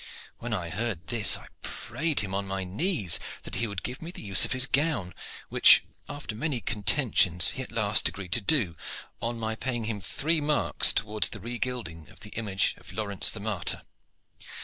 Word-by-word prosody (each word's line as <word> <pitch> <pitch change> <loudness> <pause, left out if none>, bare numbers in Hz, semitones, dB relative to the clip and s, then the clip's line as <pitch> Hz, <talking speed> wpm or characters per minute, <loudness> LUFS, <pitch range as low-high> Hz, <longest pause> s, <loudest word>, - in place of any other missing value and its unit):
When - - -6
I 85 -2 -3
heard 100 -4 -3
this 110 +4 +5
I - - -13 0.2
prayed 150 +2 -3
him 95 -2 -5
on 100 0 -2
my 95 0 -4
knees 100 - +1 0.2
that - - -10
he 115 - -1
would 100 -2 -7
give 125 +2 -5
me 165 - -8
the 175 - -10
use 100 -2 +6
of - - -7
his 130 0 +6
gown, 135 - -1 0.4
which - - +6 0.3
after 145 -6 -7
many 140 +1 -3
contentions 105 - +2
he 130 - -5
at 130 - -8
last 105 -2 +3
agreed 95 -3 -10
to 115 - +3
do, 100 - +1 0.5
on 115 +1 -3
my 110 -1 -3
paying 120 +1 -4
him 110 -2 -4
three 155 - -1
marks 150 0 +3
towards 105 0 0
the 105 - -9
regilding 115 -7 -6
of - - -18
the 105 -1 -11
image 100 -4 -1
of - - -12
Laurence 100 -1 +2
the 105 - -4
martyr. 105 -4 -1
110 Hz, 190 wpm, -27 LUFS, 95-125 Hz, 0.5 s, use